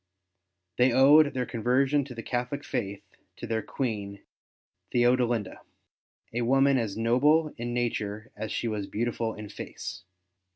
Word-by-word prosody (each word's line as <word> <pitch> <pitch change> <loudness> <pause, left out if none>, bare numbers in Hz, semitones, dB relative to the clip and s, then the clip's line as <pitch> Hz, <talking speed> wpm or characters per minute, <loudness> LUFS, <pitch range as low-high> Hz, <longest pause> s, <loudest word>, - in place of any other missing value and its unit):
They 125 +1 +4
owed 145 +4 +6
their 125 -1 0
conversion 130 +5 +1
to 130 -3 -9
the 115 - -6
Catholic 125 +3 -3
faith 100 -6 -3 0.3
to - - -7
their 110 -1 -1
Queen 100 -7 -4 0.7
Theodelinda, 120 -3 +1 0.7
a 120 - -1
woman 135 +2 +4
as 110 -4 -3
noble 145 +7 +3
in 120 +1 -4
nature 110 -3 -2
as 110 - -5
she 120 - -2
was 105 -3 -3
beautiful 115 0 -2
in 105 -1 -8
face. 90 -2 -8
120 Hz, 135 wpm, -28 LUFS, 110-130 Hz, 0.7 s, owed